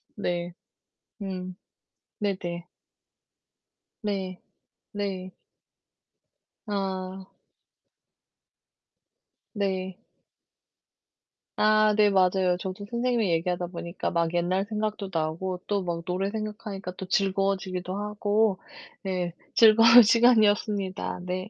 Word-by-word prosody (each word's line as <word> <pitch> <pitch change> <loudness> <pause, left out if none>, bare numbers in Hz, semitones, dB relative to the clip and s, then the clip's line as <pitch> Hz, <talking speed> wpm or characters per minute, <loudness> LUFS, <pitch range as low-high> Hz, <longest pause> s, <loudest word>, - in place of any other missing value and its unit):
네. 175 -3 -3 0.7
음 185 -1 -5 0.7
네네. 180 -4 -3 1.4
네. 190 -3 -3 0.5
네. 190 -2 -4 1.3
아. 190 -2 -4 2.3
네. 190 -3 -2 1.6
아 215 0 +4
네 210 -1 +5
맞아요. 185 -1 +3
저도 190 +2 -6
선생님이랑 235 -5 +1
얘기하다 175 +1 -1
보니까 170 0 -4
막 170 -1 0
옛날 180 +3 +1
생각도 215 -2 -3
나고 170 +3 -2
또 205 -1 0
막 170 -1 -3
노래 185 +2 -1
생각하니까 210 -3 -5
또 190 - -6
즐거워지기도 190 -1 0
하고 210 -1 0 0.4
네 180 -3 -2 0.2
즐거운 225 +2 +8
시간이었습니다. 210 -5 +3
네. 185 +2 -4
190 Hz, 180 characters per minute, -26 LUFS, 180-210 Hz, 2.3 s, 즐거운